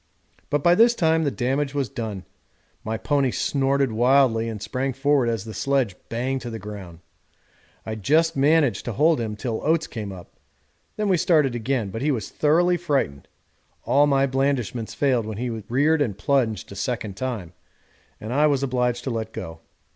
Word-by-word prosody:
But 145 Hz, -1 st, 0 dB
by 175 Hz, -, +6 dB
this 235 Hz, +5 st, +5 dB
time 160 Hz, -3 st, +2 dB
the -, -, +2 dB
damage 135 Hz, +2 st, -1 dB
was 140 Hz, -3 st, 0 dB
done. 105 Hz, -7 st, -6 dB, 0.6 s
My 110 Hz, +1 st, -2 dB
pony 140 Hz, +2 st, +1 dB
snorted 135 Hz, 0 st, 0 dB
wildly 120 Hz, -1 st, +3 dB
and 110 Hz, -2 st, -5 dB
sprang 130 Hz, +6 st, -2 dB
forward 135 Hz, -1 st, +2 dB
as 115 Hz, -3 st, -2 dB
the 110 Hz, -, -7 dB
sledge 135 Hz, -8 st, 0 dB
banged 130 Hz, +3 st, -2 dB
to 120 Hz, -, -6 dB
the 115 Hz, -, -5 dB
ground. 95 Hz, -5 st, -9 dB, 0.8 s
I 110 Hz, -, -4 dB
just 155 Hz, -, +2 dB
managed 140 Hz, -5 st, +3 dB
to 120 Hz, -, -3 dB
hold 155 Hz, +2 st, +3 dB
him 110 Hz, -2 st, -3 dB
till 110 Hz, 0 st, -4 dB
Oates 160 Hz, +1 st, +2 dB
came 105 Hz, -4 st, -6 dB
up, 90 Hz, -2 st, -11 dB, 0.6 s
then 210 Hz, -1 st, -1 dB
we 190 Hz, -2 st, +3 dB
started 155 Hz, -6 st, +3 dB
again; 120 Hz, -3 st, -2 dB
but 115 Hz, -, -5 dB
he 150 Hz, -, +1 dB
was 115 Hz, -9 st, -2 dB
thoroughly 175 Hz, +4 st, +3 dB
frightened 140 Hz, -, -1 dB, 0.6 s
all 145 Hz, +1 st, +4 dB
my 135 Hz, -1 st, +3 dB
blandishments 130 Hz, -5 st, -1 dB
failed 125 Hz, -6 st, +1 dB
when 110 Hz, -2 st, -5 dB
he 120 Hz, +1 st, -2 dB
reared 130 Hz, +9 st, +1 dB
and 110 Hz, -9 st, -1 dB
plunged 115 Hz, -3 st, 0 dB
a -, -, -8 dB
second 110 Hz, -2 st, -3 dB
time, 110 Hz, -8 st, -4 dB, 0.7 s
and 110 Hz, +3 st, -5 dB
I 150 Hz, +3 st, +4 dB
was 140 Hz, -2 st, +1 dB
obliged 125 Hz, -2 st, 0 dB
to 130 Hz, -, -3 dB
let 110 Hz, -1 st, -3 dB
go. 80 Hz, -5 st, -7 dB
130 Hz, 180 wpm, -23 LUFS, 110-145 Hz, 0.8 s, by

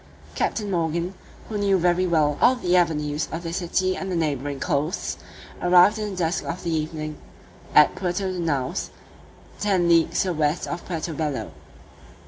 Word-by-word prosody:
Captain 210 Hz, -3 st, -1 dB
Morgan, 170 Hz, +1 st, -1 dB, 0.3 s
who 215 Hz, -2 st, -3 dB
knew 200 Hz, -1 st, +3 dB
very 180 Hz, +1 st, +2 dB
well 155 Hz, -4 st, +2 dB
all 255 Hz, -, +6 dB
the 180 Hz, -7 st, 0 dB
avenues 150 Hz, -3 st, +1 dB
of 165 Hz, +2 st, -4 dB
this 165 Hz, +1 st, -3 dB
city 185 Hz, +1 st, 0 dB
and 190 Hz, 0 st, -4 dB
the -, -, -1 dB
neighbouring 145 Hz, -3 st, -1 dB
coasts, 155 Hz, +4 st, -1 dB, 0.4 s
arrived 180 Hz, +4 st, +5 dB
in 210 Hz, -1 st, -2 dB
the 195 Hz, -, -6 dB
dusk 170 Hz, -1 st, -1 dB
of 170 Hz, -, -5 dB
the 170 Hz, -1 st, -1 dB
evening 155 Hz, -1 st, -3 dB, 0.6 s
at 150 Hz, -, +7 dB
Puerto 185 Hz, +1 st, -2 dB
de 180 Hz, -, -4 dB
Naos, 145 Hz, -6 st, -1 dB, 0.7 s
ten 190 Hz, -4 st, +2 dB
leagues 170 Hz, 0 st, +3 dB
to 190 Hz, -, -2 dB
the -, -, 0 dB
west 155 Hz, +1 st, 0 dB
of 170 Hz, -, -5 dB
Puerto 165 Hz, -1 st, -4 dB
Bello. 145 Hz, -7 st, -3 dB
170 Hz, 170 wpm, -24 LUFS, 155-185 Hz, 0.7 s, at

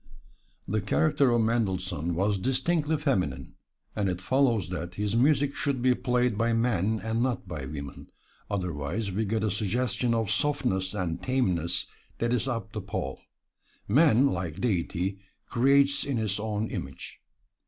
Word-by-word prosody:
The 105 Hz, +2 st, 0 dB
character 145 Hz, +5 st, +2 dB
of 120 Hz, -1 st, +3 dB
Mendelssohn 95 Hz, -7 st, -1 dB
was 100 Hz, +2 st, +1 dB
distinctly 150 Hz, -, +1 dB
feminine, 90 Hz, -, -1 dB, 0.4 s
and 100 Hz, -3 st, 0 dB
it 90 Hz, -1 st, -2 dB
follows 115 Hz, -4 st, +2 dB
that 85 Hz, -1 st, -5 dB
his 105 Hz, +2 st, -1 dB
music 140 Hz, +3 st, +3 dB
should 140 Hz, -3 st, -1 dB
be 125 Hz, +1 st, +4 dB
played 125 Hz, -3 st, 0 dB
by 115 Hz, 0 st, +2 dB
men 110 Hz, -2 st, +1 dB
and 110 Hz, +1 st, -1 dB
not 125 Hz, -5 st, -1 dB
by 75 Hz, -6 st, -5 dB
women, 70 Hz, -1 st, -8 dB, 0.4 s
otherwise 90 Hz, +2 st, -2 dB
we 110 Hz, +4 st, -1 dB
get 110 Hz, +1 st, -1 dB
a 110 Hz, -, +1 dB
suggestion 115 Hz, +3 st, 0 dB
of 110 Hz, -3 st, 0 dB
softness 105 Hz, -11 st, 0 dB
and 90 Hz, -4 st, -2 dB
tameness 90 Hz, -10 st, +1 dB, 0.3 s
that 115 Hz, +1 st, 0 dB
is 125 Hz, -, 0 dB
apt 115 Hz, -5 st, -4 dB
to -, -, -3 dB
pall. 65 Hz, 0 st, -4 dB, 0.7 s
Man, 135 Hz, +1 st, +5 dB
like 85 Hz, -, -2 dB
Deity, 95 Hz, -3 st, -1 dB, 0.3 s
creates 140 Hz, +3 st, +3 dB
in 140 Hz, -3 st, -2 dB
his 105 Hz, -3 st, -1 dB
own 110 Hz, 0 st, -2 dB
image. -, -, -7 dB
110 Hz, 150 wpm, -28 LUFS, 95-125 Hz, 0.7 s, Man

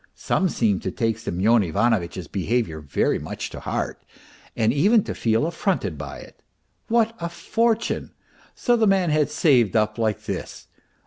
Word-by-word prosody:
Some 190 Hz, -, 0 dB
seemed 105 Hz, -, +1 dB
to -, -, -2 dB
take 115 Hz, +2 st, -1 dB
Semyon 110 Hz, +2 st, +2 dB
Ivanovitch's 95 Hz, -1 st, 0 dB
behaviour 100 Hz, -4 st, -1 dB
very 75 Hz, -2 st, 0 dB
much -, -, -6 dB
to -, -, -7 dB
heart, -, -, -3 dB, 0.5 s
and 110 Hz, +1 st, +2 dB
even 200 Hz, -, +4 dB
to -, -, -4 dB
feel 115 Hz, +4 st, +1 dB
affronted 170 Hz, -, -1 dB
by 70 Hz, -2 st, -7 dB
it. -, -, -15 dB, 0.5 s
What 230 Hz, 0 st, +2 dB
a 170 Hz, 0 st, -3 dB
fortune! 230 Hz, +6 st, -1 dB, 0.4 s
So 245 Hz, -, +2 dB
the 225 Hz, -2 st, +3 dB
man 190 Hz, -4 st, +3 dB
had 150 Hz, -1 st, +2 dB
saved 140 Hz, -, +3 dB
up 105 Hz, +1 st, +1 dB
like 110 Hz, -3 st, 0 dB
this -, -, -6 dB
115 Hz, 155 wpm, -23 LUFS, -, 0.5 s, even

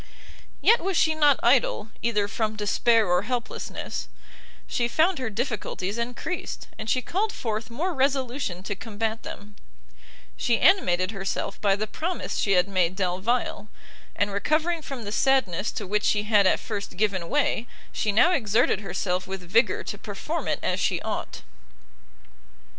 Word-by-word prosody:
Yet 465 Hz, -, +5 dB
was 375 Hz, 0 st, -1 dB
she 315 Hz, -, +4 dB
not 295 Hz, -3 st, +4 dB
idle, 235 Hz, -3 st, +3 dB
either 210 Hz, -3 st, +1 dB
from 220 Hz, +1 st, -2 dB
despair 220 Hz, +2 st, +3 dB
or 180 Hz, 0 st, +3 dB
helplessness: 245 Hz, +3 st, -4 dB, 0.6 s
she 235 Hz, -, 0 dB
found 320 Hz, +7 st, +2 dB
her 255 Hz, -3 st, -2 dB
difficulties 215 Hz, -2 st, -3 dB
encreased, 245 Hz, +9 st, -4 dB
and 220 Hz, -, -4 dB
she 255 Hz, +2 st, +1 dB
called 410 Hz, +4 st, -1 dB
forth 220 Hz, -, -4 dB
more 335 Hz, +10 st, -2 dB
resolution 265 Hz, -, -1 dB
to 205 Hz, -, -3 dB
combat 220 Hz, +2 st, -3 dB
them: 205 Hz, 0 st, -9 dB, 0.8 s
she 235 Hz, -2 st, +1 dB
animated 185 Hz, -, +4 dB
herself 195 Hz, -1 st, -3 dB
by 200 Hz, -2 st, +3 dB
the 210 Hz, +2 st, -2 dB
promise 340 Hz, +11 st, -3 dB
she 200 Hz, -, +2 dB
had 180 Hz, +1 st, +4 dB
made 185 Hz, -2 st, +1 dB
Delvile, 200 Hz, +3 st, -1 dB, 0.5 s
and 205 Hz, 0 st, 0 dB
recovering 310 Hz, -, 0 dB
from 270 Hz, -5 st, -6 dB
the 205 Hz, -, -5 dB
sadness 230 Hz, -6 st, +2 dB
to 215 Hz, -, -4 dB
which 210 Hz, +2 st, 0 dB
she 205 Hz, -1 st, +2 dB
had 210 Hz, -2 st, +4 dB
at -, -, +3 dB
first 205 Hz, -4 st, -5 dB
given 190 Hz, -4 st, 0 dB
way, 275 Hz, -5 st, +1 dB, 0.2 s
she 210 Hz, -, 0 dB
now 240 Hz, -, +5 dB
exerted 225 Hz, -, +2 dB
herself 185 Hz, -2 st, -2 dB
with 190 Hz, 0 st, -5 dB
vigour 215 Hz, +7 st, +2 dB
to -, -, -6 dB
perform -, -, -4 dB
it -, -, +1 dB
as -, -, 0 dB
she -, -, +1 dB
ought. -, -, -4 dB
220 Hz, 155 wpm, -26 LUFS, 200-260 Hz, 0.8 s, Yet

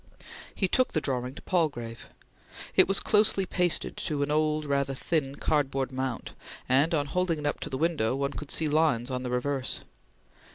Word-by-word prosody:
He 190 Hz, -, +1 dB
took 255 Hz, +7 st, +2 dB
the -, -, +2 dB
drawing 130 Hz, -2 st, -2 dB
to -, -, -11 dB
Palgrave. 130 Hz, -10 st, -2 dB, 0.7 s
It -, -, +7 dB
was 195 Hz, +1 st, +4 dB
closely 210 Hz, -2 st, +3 dB
pasted 175 Hz, -1 st, 0 dB
to 145 Hz, -3 st, 0 dB
an 145 Hz, -, -2 dB
old, 155 Hz, 0 st, +1 dB
rather 140 Hz, -1 st, 0 dB
thin, 140 Hz, -1 st, -1 dB
cardboard 135 Hz, -3 st, 0 dB
mount, 130 Hz, -2 st, -4 dB, 0.3 s
and, 140 Hz, +6 st, +3 dB
on 145 Hz, -2 st, +1 dB
holding 175 Hz, +3 st, 0 dB
it 150 Hz, -, -6 dB
up 145 Hz, -, -1 dB
to -, -, -5 dB
the 135 Hz, -, -3 dB
window, 150 Hz, -7 st, +1 dB
one 140 Hz, 0 st, -1 dB
could 150 Hz, -, -7 dB
see 160 Hz, -, +1 dB
lines 145 Hz, -5 st, +2 dB
on 125 Hz, 0 st, -2 dB
the 125 Hz, -, -4 dB
reverse. 130 Hz, +1 st, -2 dB
145 Hz, 180 wpm, -28 LUFS, 130-160 Hz, 0.7 s, It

